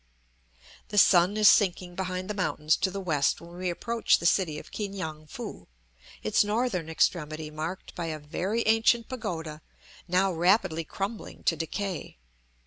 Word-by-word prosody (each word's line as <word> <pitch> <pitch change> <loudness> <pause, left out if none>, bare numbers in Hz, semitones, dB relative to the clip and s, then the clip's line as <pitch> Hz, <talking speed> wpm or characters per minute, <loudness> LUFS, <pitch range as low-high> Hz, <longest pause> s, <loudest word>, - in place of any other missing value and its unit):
The 210 - -5
sun 185 +1 +5
is 215 -1 +6
sinking 180 -3 +4
behind 185 0 -3
the 210 - -2
mountains 155 -5 +1
to 190 - 0
the 195 +1 -5
west 155 -7 +1
when 170 +1 -12
we 185 0 -1
approach 230 +6 +1
the - - -7
city 170 -3 +2
of - - -10
Ki 210 -2 -3
ngan 155 -6 -6
foo, - - -8 0.6
its 105 - +3
northern 210 -6 -1
extremity 155 -1 0
marked 160 +4 -5
by 170 -1 -4
a 155 -1 -3
very 185 +10 -2
ancient 225 +1 +3
pagoda 160 - -5 0.5
now 185 +1 +2
rapidly 175 -1 +2
crumbling 200 +7 -5
to 165 - +2
decay. 175 - -4
180 Hz, 155 wpm, -28 LUFS, 160-200 Hz, 0.6 s, is